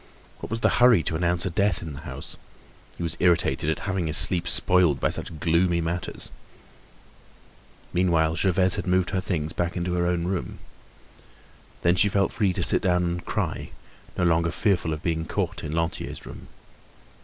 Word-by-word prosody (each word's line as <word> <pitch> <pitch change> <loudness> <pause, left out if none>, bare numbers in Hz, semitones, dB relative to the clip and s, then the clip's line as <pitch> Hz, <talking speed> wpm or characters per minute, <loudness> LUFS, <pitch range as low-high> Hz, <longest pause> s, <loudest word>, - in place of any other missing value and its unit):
What - - -7
was 115 0 -3
the - - +4
hurry 120 -9 +6
to 80 - -2
announce 85 +1 0
a 95 - -2
death 100 0 +1
in 80 -3 -6
the 70 - -8
house? - - -8 0.6
He - - -5
was 85 -1 -2
irritated 85 -3 +2
at 80 - -2
having 95 -4 -1
his 80 - +1
sleep 90 -2 +5
spoiled 90 -8 +3
by - - +1
such 80 - -6
gloomy 85 +2 +2
matters. 85 +2 -4 1.6
Meanwhile, 85 -3 +2
Gervaise 95 -1 +2
had - - -4
moved 90 0 +1
her 95 -2 -1
things 80 -4 -2
back 85 +1 -2
into 90 0 -2
her 85 0 0
own 85 -1 0
room. 90 0 -3 1.3
Then 85 +1 +4
she 100 +3 +4
felt 100 0 +1
free 100 -4 +1
to - - -2
sit - - +3
down 90 -1 +2
and 85 0 -2
cry, - - -3 0.5
no 90 - 0
longer 85 0 +2
fearful 90 -4 0
of 75 -1 -5
being 80 -1 -1
caught - - -3
in 75 - -5
Lantier's 80 +1 -3
room. - - -10
85 Hz, 180 wpm, -25 LUFS, 85-90 Hz, 1.6 s, hurry